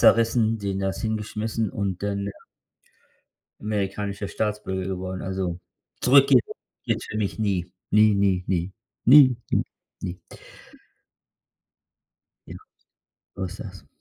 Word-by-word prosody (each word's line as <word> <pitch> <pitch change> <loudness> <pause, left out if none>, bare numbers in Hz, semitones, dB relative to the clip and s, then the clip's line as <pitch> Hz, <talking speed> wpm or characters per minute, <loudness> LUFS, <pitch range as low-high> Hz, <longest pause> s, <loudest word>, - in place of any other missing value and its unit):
zerrissen, 115 -1 +4
denen 100 -1 -2
das 95 0 -2
hingeschmissen 110 0 -2
und 100 -6 -3
dann, 100 -1 -2
ja 100 - -4 1.3
amerikanischer 100 -1 -2
Staatsbürger 105 -3 -2
geworden, 95 0 -4
also, 95 -2 -3 0.4
zurück 135 +2 +6
geht’s 130 -4 +6 0.4
geht’s - - -1
für 110 - -5
mich 105 +1 -2
nie. 95 -5 -1 0.2
Nie, 105 0 +6
nie, 95 -2 +2
nie, 90 0 -1 0.3
nie, 130 -1 +8 0.2
nie, - - +2 0.4
nie. 90 -1 -5 2.3
Ja, - - -8 0.8
so 95 - -3
ist 90 - -7
das. - - -10
100 Hz, 115 wpm, -25 LUFS, 95-110 Hz, 2.3 s, nie